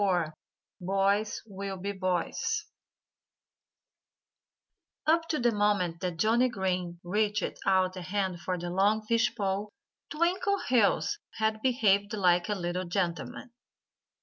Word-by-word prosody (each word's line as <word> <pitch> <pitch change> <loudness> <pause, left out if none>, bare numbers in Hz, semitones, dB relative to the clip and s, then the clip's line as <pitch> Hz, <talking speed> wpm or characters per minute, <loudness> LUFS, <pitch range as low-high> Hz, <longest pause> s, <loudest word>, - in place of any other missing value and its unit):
XXIV 175 -6 +1 0.5
BOYS 195 +3 +1
WILL 195 -2 -6
BE 200 +2 -3
BOYS 185 -3 -1 2.4
Up 330 +1 +3
to 310 - +1
the 240 -2 +2
moment 205 -5 +1
that 180 -2 -3
Johnnie 235 +7 +3
Green 185 -5 -2
reached 210 +2 -1
out 185 -1 +3
a 185 - -6
hand 185 -1 -2
for 185 0 -2
the 175 0 -4
long 205 +4 +2
fish 230 +1 +2
pole 200 -1 -1 0.4
Twinkleheels 340 - +1 0.2
had 220 -1 0
behaved 210 -5 +2
like 180 -2 +2
a 210 - +1
little 180 0 -2
gentleman. 175 +5 -3
200 Hz, 120 wpm, -29 LUFS, 180-220 Hz, 2.4 s, Up